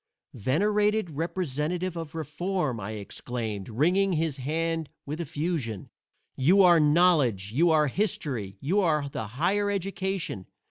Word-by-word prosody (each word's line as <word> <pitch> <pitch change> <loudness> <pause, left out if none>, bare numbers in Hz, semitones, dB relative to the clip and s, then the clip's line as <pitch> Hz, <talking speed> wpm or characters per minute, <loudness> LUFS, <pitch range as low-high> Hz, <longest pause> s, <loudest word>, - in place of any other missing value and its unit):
"Venerated 205 - +1
representative 170 +2 -2
of 165 -2 -6
Reform," 160 -4 -2
I 105 +2 -5
exclaimed, 110 0 -5
wringing 180 - +2
his 160 -3 0
hand 160 +3 -2 0.2
with 150 +4 -4
effusion, 150 - -3 0.4
"you 180 +9 +5
are 175 -2 +7
Knowledge, 150 - +3
you 165 +9 +3
are 155 -2 +4
History, 130 - -2
you 175 +9 +1
are 150 -5 +1
the 140 -6 -5
Higher 180 - 0
Education! 190 - -3
160 Hz, 125 wpm, -27 LUFS, 130-180 Hz, 0.4 s, are